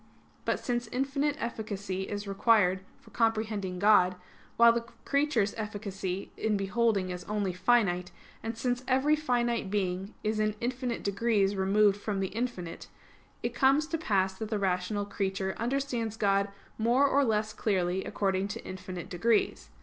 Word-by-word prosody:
But - - +1
since 240 -1 -2
infinite 275 +4 0
efficacy 205 -4 -4
is 205 0 -4
required 195 -2 +3 0.2
for 225 - -19
comprehending 215 -4 0
God, 185 -2 +5 0.4
while 235 0 +7
the 235 0 -2 0.2
creature's 280 -8 +2
efficacy 200 -3 -4
in 215 -2 0
beholding 195 -1 +1
is 180 0 -5
only 205 -3 -1
finite; 185 -2 +2 0.3
and 225 +1 -4
since 245 +1 -1
every 270 +4 +3
finite 240 -7 0
being 190 0 -2
is 215 0 0
in 215 0 +1
infinite 245 0 -2
degrees 200 -1 +1
removed 200 +1 +3
from 205 -1 -3
the 190 -1 -1
infinite; 215 -8 -4 0.6
it - - -1
comes 275 +3 +4
to 330 - 0
pass 190 - +1
that 220 - -4
the 215 - 0
rational 195 +1 0
creature 190 -1 -2
understands 240 -3 -1
God 200 -1 +2 0.3
more 240 +5 +4
or 280 +1 +3
less 215 -3 0
clearly 190 -3 0
according 195 -1 0
to 230 +3 -7
infinite 185 -1 -6
degrees. 215 +5 +1
210 Hz, 150 wpm, -29 LUFS, 195-235 Hz, 0.6 s, while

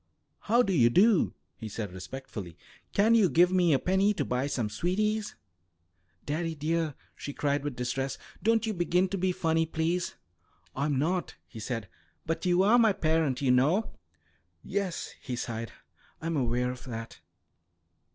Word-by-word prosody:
"How 235 +4 +3
do 195 - 0
you 120 -8 +5
do," 200 - +4 0.2
he 110 - -7
said 105 -3 -5
respectfully. 95 -3 -8 0.3
"Can 215 +3 +4
you 215 -6 +5
give 175 +3 +4
me 180 -3 +3
a 140 - +5
penny 190 +6 +2
to - - -1
buy 125 +2 -1
some 125 -6 -1
sweeties?" 205 - -1 0.9
"Daddie, 160 +2 -2
dear!" 155 0 -1 0.2
she 145 - -6
cried 145 0 0
with 145 -3 -3
distress. 125 +2 -2 0.2
"Don't 225 +1 +2
you 220 - -1
begin 180 +1 +1
to 195 - -2
be 185 +1 +2
funny, 165 -2 +1
please." 165 +2 -1 0.6
"I'm 140 0 0
not," 175 +6 -1
he 115 - -10
said. 115 -2 -4 0.4
"But 165 +3 -2
you 180 +1 +4
are 225 +5 +5
my 220 -3 +5
parent, 155 -6 +1
you 130 - +4
know." 150 - +3 0.7
"Yes," 195 -3 -3
he 125 - -4
sighed, 115 -1 -4 0.5
"I'm 165 +1 -2
aware 125 -2 0
of 125 - -10
that. 115 -2 -7
160 Hz, 160 wpm, -29 LUFS, 125-185 Hz, 0.9 s, you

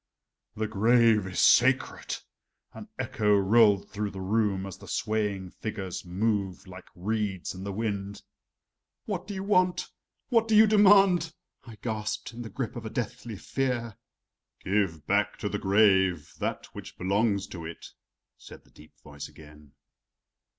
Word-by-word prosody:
"The 110 - -1
grave 110 -1 +3
is 95 - -4
sacred!" 130 +2 +3 0.6
an - - -10
echo 105 -2 +1
rolled 100 0 +4
through 105 0 -3
the 95 - -9
room 100 0 0
as 95 - -8
the - - -13
swaying 105 -5 -2
figures 95 -5 -5
moved 95 0 -2
like 90 0 -12
reeds 100 0 -2
in 95 0 -8
the 100 - -4
wind. 100 -1 -4 0.8
"What - - -4
do 205 - -5
you 190 - -4
want? 185 -3 +1 0.4
What 230 -3 +3
do 220 - +2
you 215 +1 +8
demand?" 195 -6 +5 0.3
I 115 - -10
gasped 110 -1 -3
in 120 - -8
the 115 - -7
grip 130 -2 -4
of 120 - -6
a - - -5
deathly 115 -1 -5
fear. 120 -1 -2 0.7
"Give 95 -6 0
back 100 +3 +1
to - - -3
the 105 - -3
grave 95 -5 +3
that - - -3
which - - -10
belongs 100 +1 +1
to 85 -4 -8
it," 80 +1 -8 0.5
said - - -13
the - - -26
deep 75 - -18
voice 75 -1 -9
again. 75 -2 -16
105 Hz, 150 wpm, -28 LUFS, 95-115 Hz, 0.8 s, you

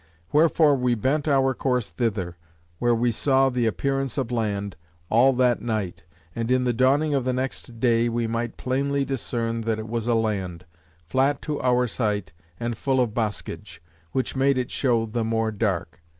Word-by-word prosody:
Wherefore 155 -1 +4
we 125 -1 +1
bent 140 +7 0
our 135 -2 +3
course 125 -5 -1
thither, 95 -1 -2 0.4
where 120 -1 +3
we 120 +1 +1
saw 135 +3 +3
the 120 -2 +1
appearance 135 +4 -1
of 130 -3 -1
land, 100 -4 -2 0.4
all 125 +4 +6
that 125 -1 +2
night; 100 -8 -3 0.3
and 115 0 -2
in 130 0 +3
the 125 -1 +1
dawning 140 +5 +3
of 135 -2 +1
the 130 0 0
next 125 -2 -4
day, 120 -1 +3
we 115 0 -1
might 115 +1 -3
plainly 140 +2 0
discern 115 -3 -2
that 110 -1 -1
it 110 0 -6
was 115 0 -3
a 120 - +3
land; 95 -6 -2 0.4
flat 135 - +1
to 150 -2 -3
our 125 0 +3
sight, 105 -8 -2 0.3
and 120 0 -2
full 135 -1 +1
of 120 -4 +1
boscage; 110 -7 -4 0.3
which 130 +1 -1
made 135 0 +3
it 125 -1 -2
show 120 -4 +1
the 115 +1 -2
more 115 0 0
dark. 95 -6 -2
120 Hz, 180 wpm, -24 LUFS, 110-130 Hz, 0.4 s, all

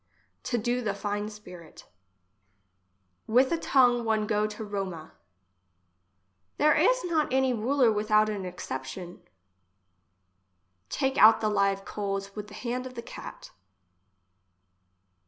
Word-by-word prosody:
To 240 - 0
do 240 +2 -1
the 205 -4 -2
fine 205 +1 -3
spirit 180 -6 -13 1.4
With 255 +4 +3
a 335 - +2
tongue 245 -5 +3
one 220 -1 0
go 210 0 +1
to 210 +1 -7
Roma. 190 -6 -5 1.4
There 305 +1 +4
is - - +3
not 325 -5 0
any 265 -1 +2
mler 245 +1 +2
without 215 0 +2
a 205 -3 -3
exception. 175 0 -7 1.7
Take 270 - -1
out 220 +1 +8
the 215 - 0
live 195 -1 +1
coals 195 -1 -4
with 210 -1 -6
the 205 - -12
hand 250 +2 -4
of 255 - -12
the 235 - -6
cat. - - -10
215 Hz, 120 wpm, -28 LUFS, 200-245 Hz, 1.7 s, out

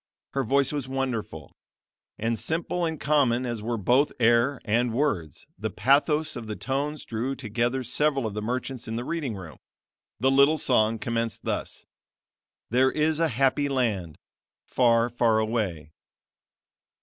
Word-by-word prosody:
Her 135 - -1
voice 140 +3 +2
was 145 -3 -3
wonderful; 125 - -4 0.6
and 115 +1 -1
simple 170 +2 -1
and 160 -2 -3
common 130 -5 +2
as 120 -3 -3
were 115 +2 -2
both 125 +8 +3
air 120 +3 +3
and 115 +1 +1
words, 95 - -1
the - - -2
pathos 150 - +2
of 120 -3 -7
the 105 - -4
tones 140 +4 -3
drew 120 +4 -3
together 120 +2 -1
several 135 +2 +1
of 110 - -3
the 105 - -3
merchants 125 +2 -4
in 110 - -4
the 120 - -3
reading 150 -9 -3
room. 85 -8 -10 0.6
The 130 +3 +3
little 140 +3 +5
song 115 -5 +2
commenced 115 -1 -3
thus: - - -4 0.9
"There 130 +2 +4
is 155 +1 +1
a 165 - +3
happy 135 +2 +1
land, 105 - -1 0.5
Far, 115 -2 +3
far 120 -2 +2
away." 105 -9 -2
120 Hz, 150 wpm, -26 LUFS, 110-140 Hz, 0.9 s, little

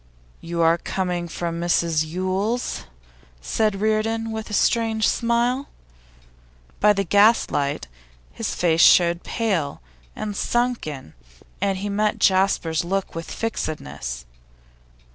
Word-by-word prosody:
'You 170 0 -3
are 165 +1 +4
coming 180 -2 -2
from 170 0 -4
Mrs 170 -2 +2
Yule's?' 185 - -2 0.5
said 195 - 0
Reardon, 220 +1 0
with 220 0 -5
a - - -9
strange 220 0 +2
smile. 240 +3 0 1.1
By 210 - +5
the 200 -1 +1
gaslight 195 - +2 0.5
his - - -3
face 165 -2 +2
showed 170 -1 +6
pale 185 -11 -1 0.4
and 210 -1 -4
sunken, 230 - -2 0.5
and 195 -1 +1
he 200 +2 -3
met 210 +1 0
Jasper's 185 -4 +2
look 195 +2 -2
with 165 0 -6
fixedness. 70 - -4
190 Hz, 110 wpm, -23 LUFS, 165-220 Hz, 1.1 s, showed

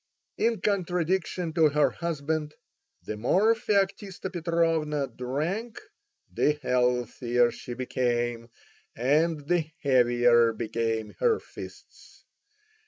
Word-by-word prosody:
In 230 -4 +1
contradistinction 180 -3 -1
to 160 -1 +4
her 150 0 +2
husband, 155 -2 -3 0.5
the 110 - -5
more 190 - +3
Feoktista 200 -3 -1
Petrovna 165 -4 0
drank 160 - -4 0.5
the 150 - +2
healthier 125 -3 +1
she 120 - -8
became, 120 -2 -1 0.5
and 150 +4 +1
the 170 -2 +1
heavier 120 -3 +4
became 115 -1 -2
her 460 -2 +3
fists. - - -13
150 Hz, 95 wpm, -27 LUFS, 120-175 Hz, 0.5 s, to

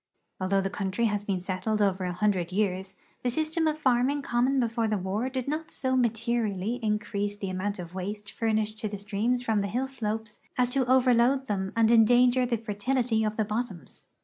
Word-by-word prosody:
Although 195 +1 +1
the 195 0 -2
country' 200 +3 -1
has 205 -2 0
been 195 -3 -1
settled 190 +4 -2
over 190 -2 +1
a 180 - -1
hundred 185 -2 0
years, 190 -1 -1 0.3
the 250 - 0
system 315 +4 0
of 305 -1 0
farming 270 0 +2
common 255 +2 +1
before 230 -2 0
the 215 -1 0
war 200 +7 -2
did 260 -1 -4
not 310 +2 -3
so 260 -1 -1
materially 230 -2 0
increase 210 -1 -1
the 195 -2 -4
amount 200 +2 -2
of 175 -1 -8
waste 200 +2 -5
furnished 220 -1 -1
to 215 - -2
the 205 0 -5
streams 215 +5 -1
from 220 -4 +1
the 200 - -1
hill 250 +7 -1
slopes 220 -4 -4 0.2
as 250 -1 +2
to 260 -1 +1
overload 255 +1 +4
them 190 -4 -2
and 230 0 +4
endanger 245 +2 +5
the 235 -1 0
fertility 225 +2 0
of 215 0 -1
the 220 - +1
bottoms. 210 - -5
220 Hz, 195 wpm, -28 LUFS, 200-245 Hz, 0.3 s, endanger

